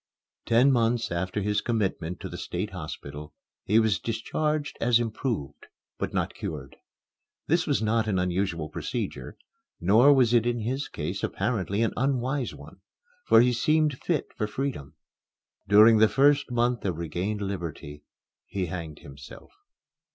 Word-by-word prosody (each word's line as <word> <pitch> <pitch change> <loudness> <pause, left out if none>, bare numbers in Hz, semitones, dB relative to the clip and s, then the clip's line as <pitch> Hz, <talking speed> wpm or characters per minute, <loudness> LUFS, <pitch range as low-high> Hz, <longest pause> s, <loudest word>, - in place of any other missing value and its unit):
Ten 125 +4 +5
months 115 -3 +1
after 90 +4 -2
his 105 +1 0
commitment 95 -7 -2
to - - -5
the - - -8
State 95 +4 -4
Hospital 75 -3 -8 0.3
he 105 - +3
was 110 -6 +2
discharged 145 +7 -2
as 120 0 +4
improved 110 - -4 0.3
but - - -2
not - - -1
cured. 70 -4 -7 0.7
This 170 +3 +1
was 140 -7 +1
not 110 0 +1
an 100 -3 0
unusual 90 -3 -1
procedure; - - -5 0.4
nor 110 +10 +5
was 125 -4 +4
it 120 -1 +3
in 120 -1 -1
his 130 +6 -2
case 75 - -5
apparently 105 -2 -1
an 115 - 0
unwise 130 0 -1
one, - - -14 0.5
for 115 - +7
he 125 0 +3
seemed 150 +3 +1
fit 165 -5 -2
for 105 - -2
freedom. 105 - -4 0.7
During 110 +2 +7
the 110 0 +6
first 140 +1 +3
month 120 0 0
of 90 -5 -2
regained 90 +6 -3
liberty, 80 -6 -6 0.4
he 95 -2 -2
hanged 80 -3 -7
himself. 70 0 -12
110 Hz, 145 wpm, -27 LUFS, 90-125 Hz, 0.7 s, for